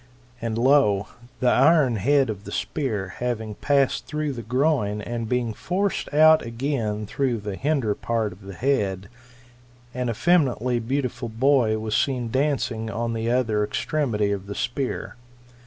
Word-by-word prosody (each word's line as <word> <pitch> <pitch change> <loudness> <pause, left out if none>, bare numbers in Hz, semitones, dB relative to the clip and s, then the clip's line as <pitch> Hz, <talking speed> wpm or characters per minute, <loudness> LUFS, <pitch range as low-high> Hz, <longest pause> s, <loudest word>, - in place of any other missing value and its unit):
And 115 -1 -2
lo! 120 -6 +3 0.3
the 125 - +4
iron 135 -4 +4
head 135 +3 +2
of 100 -1 -8
the - - -7
spear 110 -11 -2
having 110 -3 -2
passed 135 0 +1
through 150 +1 -2
the 120 - -6
groin, 125 -4 0
and 115 +1 -4
bein«; 125 -3 0
forced 190 - -2
out 155 +1 +6
again 115 -3 -2
through 130 +2 -1
the 105 -2 -5
hinder 135 -4 0
part 115 -1 -2
of 90 - -18
the 95 -1 -9
head, 100 -7 -1 0.8
an 125 -1 -2
effeminately 125 -2 +2
beautiful 125 0 -2
boy 115 -1 +2
was 110 0 -2
seen 125 -4 0
dancing 130 -5 0
on 115 +1 -2
the 115 0 -2
other 115 -4 +1
extremity 110 -4 -1
of 100 -1 -4
the 100 - -6
spear. 125 +2 -3
120 Hz, 150 wpm, -24 LUFS, 110-140 Hz, 0.8 s, out